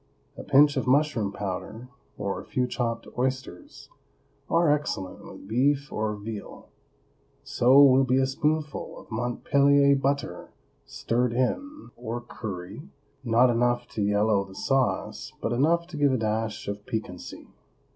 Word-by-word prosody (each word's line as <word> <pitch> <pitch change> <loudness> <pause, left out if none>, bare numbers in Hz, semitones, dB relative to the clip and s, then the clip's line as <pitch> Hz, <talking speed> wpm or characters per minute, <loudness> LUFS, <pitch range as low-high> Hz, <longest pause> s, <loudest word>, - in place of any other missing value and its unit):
A - - -8
pinch 145 +1 +5
of 130 - -1
mushroom 130 -7 +2
powder, 100 +5 -6 0.3
or 100 -1 -3
a - - -12
few 125 - -1
chopped 115 -2 -3
oysters, 130 - -4 0.6
are 165 0 +3
excellent 120 -11 -4
with - - -12
beef 140 +5 +1
or 105 0 -1
veal; 105 0 -8 0.7
so 130 +3 +4
will 135 -1 +6
be 130 0 +2
a 135 - +3
spoonful 150 +2 -2
of - - -14
Montpellier 140 +4 +3
butter 135 -9 -2 0.4
stirred 120 +1 -1
in, 280 - -2
or 120 0 -5
curry, 110 - -8 0.3
not 120 +1 +4
enough 120 +1 +1
to 105 - -4
yellow 105 0 +2
the 95 -1 -14
sauce, 135 +4 -1
but 115 - -2
enough 165 +7 +2
to 165 - -7
give 145 -2 +3
a - - +2
dash 110 -1 -2
of 100 0 -5
piquancy. 110 -5 -6
125 Hz, 140 wpm, -26 LUFS, 110-140 Hz, 0.7 s, will